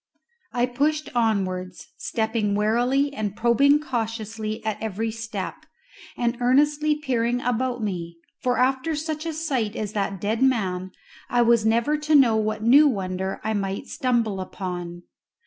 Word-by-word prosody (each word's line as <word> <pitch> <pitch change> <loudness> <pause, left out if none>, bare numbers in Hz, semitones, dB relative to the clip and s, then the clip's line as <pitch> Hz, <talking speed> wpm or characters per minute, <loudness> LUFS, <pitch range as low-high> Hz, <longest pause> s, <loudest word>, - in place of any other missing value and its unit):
I 245 -1 +1
pushed 295 +5 -1
onwards, 185 - -1
stepping 220 -6 -1
warily 245 +7 +2
and 210 -6 -3
probing 275 +6 +4
cautiously 225 -4 -4
at 215 -2 -2
every 220 +1 -2
step, 220 -4 -6 0.5
and 240 0 -1
earnestly 295 +4 +3
peering 245 -5 0
about 245 -1 -1
me, 170 -4 -4 0.2
for 250 0 +1
after 265 +5 +1
such 310 +1 -3
a 325 - -2
sight 265 -9 -1
as 210 -1 -4
that 200 -2 -2
dead 215 +5 -1
man 190 -8 +1 0.4
I 245 -1 +3
was 230 -2 +4
never 235 +7 +2
to 305 0 +2
know 250 -6 +6
what 215 0 -1
new 280 +6 +7
wonder 190 -5 -2
I 220 - -1
might 195 -1 -2
stumble 230 -6 0
upon. 175 -2 -6
230 Hz, 145 wpm, -24 LUFS, 210-260 Hz, 0.5 s, new